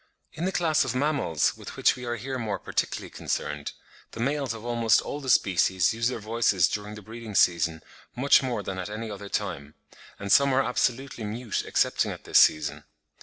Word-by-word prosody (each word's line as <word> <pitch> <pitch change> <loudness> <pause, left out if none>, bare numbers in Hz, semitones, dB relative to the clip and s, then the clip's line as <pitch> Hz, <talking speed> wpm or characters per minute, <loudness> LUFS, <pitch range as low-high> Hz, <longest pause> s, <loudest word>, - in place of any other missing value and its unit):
In 165 - -3
the 190 - 0
class 160 -4 +2
of 130 -2 -3
Mammals, 140 - +1
with - - -10
which - - +3
we 125 -1 -8
are 120 0 -2
here 130 +3 -5
more 105 -4 -2
particularly - - -3
concerned, 75 0 -4 0.4
the - - -8
males 135 +1 -1
of 115 0 -7
almost 115 -2 +3
all 145 - -5
the 135 - -5
species 95 -3 +3
use 115 +1 0
their 125 - -2
voices 110 -5 +2
during 105 0 -5
the 105 - -11
breeding 110 0 -9
season 85 -3 +2 0.3
much 135 +3 +5
more 120 -6 -2
than 95 -1 -5
at 90 - -5
any 110 +1 -5
other 100 0 -8
time; 80 -10 -4 0.4
and 100 0 -5
some 140 -1 +5
are 135 - +3
absolutely 125 0 -1
mute 110 +2 -3
excepting - - +1
at - - -7
this - - +4
season. 75 -1 +3
115 Hz, 195 wpm, -26 LUFS, 100-130 Hz, 0.4 s, much